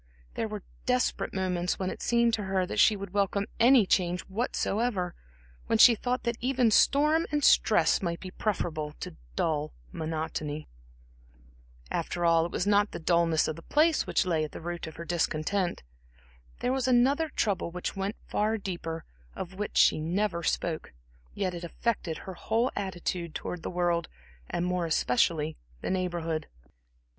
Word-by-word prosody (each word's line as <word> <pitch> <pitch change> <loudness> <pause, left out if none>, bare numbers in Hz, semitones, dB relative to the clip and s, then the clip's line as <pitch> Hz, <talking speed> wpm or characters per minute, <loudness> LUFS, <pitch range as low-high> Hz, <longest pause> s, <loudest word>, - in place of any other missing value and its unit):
There 225 - -2
were 210 -3 -6 0.2
desperate 250 0 +1
moments 180 -2 -1
when 185 -1 -2
it - - -8
seemed 235 -1 +3
to 210 -3 -1
her 190 -1 +1
that - - -3
she 215 - +6
would 200 -2 -7
welcome 200 0 +1
any 240 -2 +6
change 180 -1 +1
whatsoever, 205 -2 -1 0.5
when 225 - +2
she 235 +2 +9
thought 250 +3 -2
that 235 -1 -1
even 250 -2 +2
storm 300 +8 +4
and 295 -1 0
stress 170 - +4
might 170 -2 -2
be 185 - -8
preferable 160 -8 -2
to - - -6 0.2
dull 155 - -1 0.2
monotony. 155 -1 -4 1.2
After 175 - -1
all, 165 0 +4
it - - -13
was 180 - -1
not 205 0 +3
the - - -4
dullness 170 -1 +2
of 155 - -2
the 165 - -10
place 310 - +2
which - - +2
lay 165 -4 +1
at 155 - -5
the - - -6
root 175 0 -5
of 160 - -9
her 170 - -7
discontent. 175 - -1 0.8
There 250 - +1
was 265 -1 0
another 265 +6 +3
trouble 200 -10 0
which 180 +3 -4
went 195 +2 -2
far 215 +2 +1
deeper 170 -5 -5 0.3
of 185 +1 -6
which 205 +2 -4
she - - +5
never 170 +3 -1
spoke; 165 - -2 0.4
yet 190 -3 -1
it 175 0 -6
affected 175 -2 -2
her 190 - -6
whole 230 +7 0
attitude 175 -3 -3
towards 180 - -4
the - - -4
world, 175 -1 0 0.4
and 175 - -1
more 180 -1 0
especially 155 +2 +1 0.2
the - - -2
Neighborhood. 170 -4 -2
185 Hz, 165 wpm, -29 LUFS, 170-220 Hz, 1.2 s, she